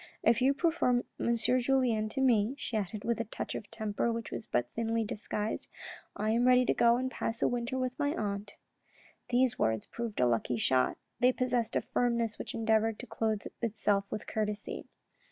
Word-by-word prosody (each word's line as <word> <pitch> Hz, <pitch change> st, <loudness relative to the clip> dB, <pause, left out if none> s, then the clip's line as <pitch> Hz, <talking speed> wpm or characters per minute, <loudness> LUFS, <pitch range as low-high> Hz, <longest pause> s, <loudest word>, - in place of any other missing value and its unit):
If 235 Hz, +1 st, +4 dB
you 270 Hz, +2 st, +4 dB
prefer 280 Hz, -6 st, +2 dB, 0.2 s
M. 235 Hz, -, +2 dB
Julien 245 Hz, -2 st, +2 dB
to 265 Hz, -, -3 dB
me," 240 Hz, -1 st, +3 dB
she 240 Hz, -, -4 dB
added, 210 Hz, 0 st, -2 dB
with 235 Hz, -1 st, 0 dB
a -, -, -3 dB
touch 220 Hz, -, -5 dB
of 210 Hz, -, -6 dB
temper 220 Hz, 0 st, -1 dB
which 230 Hz, -1 st, -4 dB
was -, -, -5 dB
but 120 Hz, -, 0 dB
thinly 230 Hz, 0 st, 0 dB
disguised, 210 Hz, 0 st, -3 dB, 0.3 s
" -, -, -21 dB
I 215 Hz, +1 st, 0 dB
am 240 Hz, +2 st, +3 dB
ready 250 Hz, 0 st, +6 dB
to -, -, +3 dB
go 235 Hz, 0 st, +4 dB
and 260 Hz, +1 st, -2 dB
pass 225 Hz, -3 st, -2 dB
a -, -, +5 dB
winter 245 Hz, +1 st, -2 dB
with 255 Hz, 0 st, -2 dB
my 290 Hz, +1 st, +1 dB
aunt." 205 Hz, -1 st, -3 dB, 0.7 s
These 250 Hz, 0 st, +2 dB
words 110 Hz, -1 st, +1 dB
proved 235 Hz, -3 st, -5 dB
a 125 Hz, -, +5 dB
lucky 120 Hz, 0 st, +1 dB
shot. 130 Hz, +3 st, +2 dB, 0.2 s
They 250 Hz, +1 st, +5 dB
possessed 250 Hz, -3 st, 0 dB
a -, -, +3 dB
firmness 235 Hz, -2 st, 0 dB
which -, -, -5 dB
endeavoured 225 Hz, -1 st, +2 dB
to -, -, -8 dB
clothe 220 Hz, -2 st, -1 dB, 0.2 s
itself 205 Hz, -3 st, +1 dB
with 210 Hz, -, -4 dB
courtesy. 210 Hz, -1 st, -3 dB
230 Hz, 190 wpm, -31 LUFS, 215-250 Hz, 0.7 s, ready